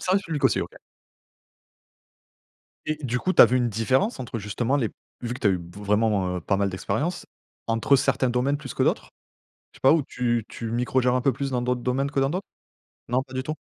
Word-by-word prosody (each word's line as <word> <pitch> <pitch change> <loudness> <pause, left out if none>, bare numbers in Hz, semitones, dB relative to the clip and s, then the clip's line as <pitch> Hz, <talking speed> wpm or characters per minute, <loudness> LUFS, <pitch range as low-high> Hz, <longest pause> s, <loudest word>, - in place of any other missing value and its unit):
Service 190 +2 +1
public 150 -4 -3
aussi, 135 - +4
OK. - - -6 2.1
Et 155 - -1
du 125 -1 -1
coup, 185 - 0
tu - - +8
as - - +11
vu 125 - +1
une 120 -1 +1
différence 130 - +1
entre, 115 -2 -5
justement, 115 +7 -1
les 115 -6 0 0.3
vu 120 0 -3
que 125 - -8
tu 105 - +2
as - - +5
eu 90 - +1 0.2
vraiment, 105 -3 +1
heu, 90 - -6
pas 100 +3 0
mal 100 0 +1
d'expériences, 145 - -2 0.4
entre 115 +5 +3
certains 130 -1 +1
domaines 125 +4 +1
plus 135 -4 -8
que - - +1
d'autres? - - 0 0.6
Je - - -17
sais - - -33
pas 135 - +7
où 160 -2 +3
tu 120 -4 -1
tu 115 -1 -6
micro 125 +2 +1
gères 125 0 +2
un 125 - +2
peu 135 +2 +2
plus 135 +2 -3
dans 125 -1 0
d'autres 125 0 0
domaines 135 +3 0
que 140 - 0
dans 135 +1 +2
d'autres? 185 +4 -3 0.6
Non, 125 +2 +1
pas 130 - -13
du 130 - -1
tout? 155 +3 -3
125 Hz, 230 wpm, -25 LUFS, 115-140 Hz, 2.1 s, as